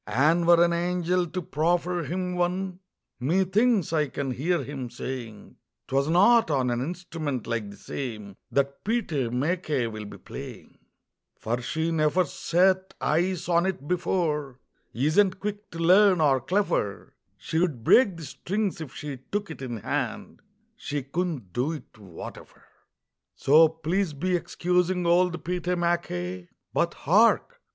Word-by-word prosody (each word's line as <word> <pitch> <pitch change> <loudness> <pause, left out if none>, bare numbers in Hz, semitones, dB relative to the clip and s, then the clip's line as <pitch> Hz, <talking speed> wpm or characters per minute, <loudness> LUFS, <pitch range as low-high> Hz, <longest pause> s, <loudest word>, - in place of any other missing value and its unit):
And 155 +10 +2
were 170 0 +7
an 170 0 +2
angel 175 +1 0
to 180 +2 -4
proffer 175 +4 0
him 180 +4 -3
one, 180 +1 -1 0.4
Methinks 190 - +2
I 150 -2 +2
can 140 0 -3
hear 150 +5 0
him 130 -2 -6
saying: 120 -3 -7 0.3
"'Twas 135 +1 +1
not 215 +7 +5
on 130 -4 +1
an 120 0 -1
instrument 155 -4 -4
like 110 -3 -3
the 100 - -11
same 105 -7 -6 0.2
That 140 0 0
Pete 230 -2 -1
MacKay 140 +2 0
will 110 -2 -6
be - - -10
playing, - - -10 0.6
"For 120 +2 -2
she 160 +6 -1
neffer 160 +3 +2
set 185 +3 +1
eyes 175 +3 0
on 170 +1 +3
it 160 -7 -4
before, 150 -7 -1 0.3
Isn't 185 - +2
quick 205 +1 -5
to 165 - -9
learn, 185 +2 +5
or 140 -4 +3
cleffer; 180 - -1 0.2
She'd 160 -8 -1
break 200 - +5
the 165 - -7
strings 195 +6 -3
if 145 -5 -8
she 145 -3 -6
took 205 -4 -2
it 135 - -9
in 120 -3 -4
hand, - - -3 0.4
She 145 -1 -4
couldn't 140 - -3
do 135 +7 0
it, 155 - -10
whateffer. 95 -6 -11 0.7
"So 155 +3 +6
please 160 +2 -1
be 180 +6 0
excusing 180 +1 0
old 175 +1 +2
Pete 180 0 -3
MacKay 90 - -2 0.2
But - - +1
hark! - - +3
165 Hz, 145 wpm, -26 LUFS, 135-180 Hz, 0.7 s, were